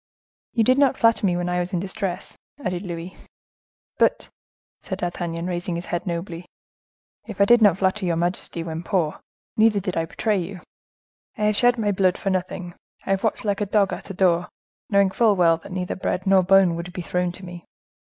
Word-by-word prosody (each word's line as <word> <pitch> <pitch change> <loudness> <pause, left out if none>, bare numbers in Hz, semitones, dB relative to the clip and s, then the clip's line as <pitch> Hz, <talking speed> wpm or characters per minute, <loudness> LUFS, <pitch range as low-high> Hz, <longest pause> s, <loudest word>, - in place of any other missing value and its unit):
"You 230 - +3
did 255 +4 +3
not 280 -3 +3
flatter 230 -3 +3
me 175 -1 +1
when 175 0 -2
I 180 0 0
was 180 +2 -3
in 180 - +1
distress," 190 0 -4 0.3
added 180 -1 -2
Louis. 175 -1 -6 0.8
"But," - - +2 0.5
said 190 - -5
D'Artagnan, 175 -2 -3
raising 175 -1 -3
his 170 +1 -5
head 175 +2 -3
nobly, 170 0 -4 0.8
"if 215 -4 -8
I 200 - +6
did 240 +2 +5
not 205 -4 +5
flatter 190 0 0
your 170 - +1
majesty 170 0 -2
when 165 -1 -5
poor, 170 -3 -1 0.4
neither 215 -1 +4
did 185 -2 -4
I 165 - 0
betray 210 +4 -1
you. 180 +1 -6 0.8
I 215 - -2
have 210 0 +2
shed 245 +2 +4
my 210 -2 +1
blood 185 -2 +2
for 195 - -2
nothing; 180 -1 -3 0.3
I - - -2
have 195 0 0
watched 220 - -1
like 205 0 0
a 205 - 0
dog 200 -1 +2
at - - -8
a 195 - -6
door, 175 -2 +2 0.4
knowing 200 -2 +3
full 220 0 +3
well 170 -3 +4
that 165 - -13
neither 180 -1 -3
bread 185 0 -2
nor 190 -1 +5
bone 190 -1 +4
would 170 +1 -6
be 180 - -5
thrown 180 +1 -1
to 185 - -11
me. 175 -1 -9
185 Hz, 205 wpm, -23 LUFS, 175-200 Hz, 0.8 s, I